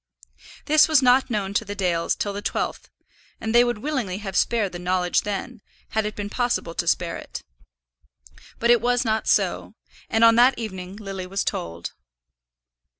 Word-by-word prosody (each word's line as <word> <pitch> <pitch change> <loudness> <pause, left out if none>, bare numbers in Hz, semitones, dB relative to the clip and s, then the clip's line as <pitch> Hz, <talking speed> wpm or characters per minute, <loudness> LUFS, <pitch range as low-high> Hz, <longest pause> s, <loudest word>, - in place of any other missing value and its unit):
This 305 +1 +5
was 310 -4 +4
not 255 +1 +4
known 200 -4 -2
to 215 - +1
the 205 -1 -6
Dales 175 -4 0
till 205 - -3
the 205 - -5
twelfth, - - -3 0.5
and 220 0 -3
they 240 0 +7
would 240 -2 -1
willingly 235 -7 -3
have 195 -2 -6
spared 215 -3 +1
the 175 - -7
knowledge 180 0 +1
then, 210 +3 -5 0.3
had 220 -1 0
it 210 - -6
been 205 -1 -4
possible 235 -7 -1
to 170 - -3
spare 170 0 0
it. - - -9 1.1
But 235 +1 +3
it 240 -2 +5
was 245 +1 +1
not 220 0 0
so, - - +1 0.3
and 225 +1 +2
on 230 0 +7
that 250 +2 +5
evening 190 -4 -6
Lily 195 -3 -6
was 195 +1 -2
told. 85 0 -4
210 Hz, 175 wpm, -23 LUFS, 185-240 Hz, 1.1 s, they